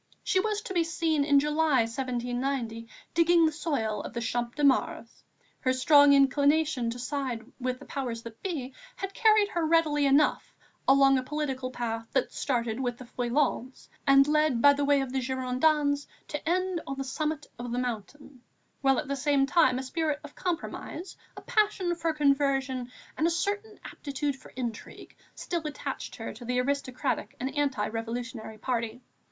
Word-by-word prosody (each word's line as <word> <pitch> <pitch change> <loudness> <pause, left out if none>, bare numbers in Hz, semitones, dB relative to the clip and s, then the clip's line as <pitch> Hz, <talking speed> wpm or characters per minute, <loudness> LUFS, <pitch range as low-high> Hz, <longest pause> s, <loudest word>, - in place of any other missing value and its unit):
She 375 - +2
was 425 +1 -1
to 380 - -5
be 345 -2 +3
seen, 325 -2 0
in 285 -1 +5
July, 300 -2 +2
1790, 245 0 -2 0.3
digging 335 0 +5
the 315 - +2
soil 230 - -2
of - - -8
the 235 - -3
Champ 235 +1 -2
de 295 - -2
Mars. 280 -1 +1 0.4
Her 255 -2 +1
strong 285 +2 +6
inclination 280 -1 +3
to 235 - -4
side 255 -3 -3
with 255 0 -2
the - - -13
powers 240 -5 -4
that 230 -1 -10
be 280 -9 -4 0.2
had 390 0 -5
carried 430 -2 +4
her 345 -5 -1
readily 310 -3 +3
enough 285 +2 +2 0.3
along 270 0 +6
a - - -4
political 265 -2 -3
path 230 -2 -4
that 260 - 0
started 235 -3 -1
with 245 -2 -2
the 255 - -10
Feuillants 250 +1 -1 0.2
and 275 0 +6
led 305 -4 +2
by 285 +4 +7
way 285 0 +2
of 265 -1 -4
the 265 - 0
Girondins 280 +3 +1 0.2
to 295 +2 -3
end 365 -1 0
on 275 - -4
the 270 - -2
summit 305 +3 -3
of 240 0 -5
the 240 - -2
Mountain, 250 +3 -5 0.4
while 270 -1 +3
at - - -2
the 280 - -1
same 280 0 +2
time 275 -4 +3
a 260 - -3
spirit 300 +2 -1
of 295 0 -10
compromise, 355 0 -4 0.2
a - - -7
passion 420 -6 +1
for 335 -1 -1
conversion 275 -4 +1 0.3
and 320 - +3
a - - +3
certain 410 +5 -2
aptitude 285 0 -3
for - - -15
intrigue 235 -4 -6 0.2
still 345 -1 -3
attached 285 -2 -5
her 225 - -6
to 230 +4 -11
the 250 +1 0
aristocratic 260 0 -2
and 260 +4 -3
anti 275 -8 0
revolutionary 225 0 -5
party. 235 +1 -3
275 Hz, 170 wpm, -28 LUFS, 250-305 Hz, 0.4 s, by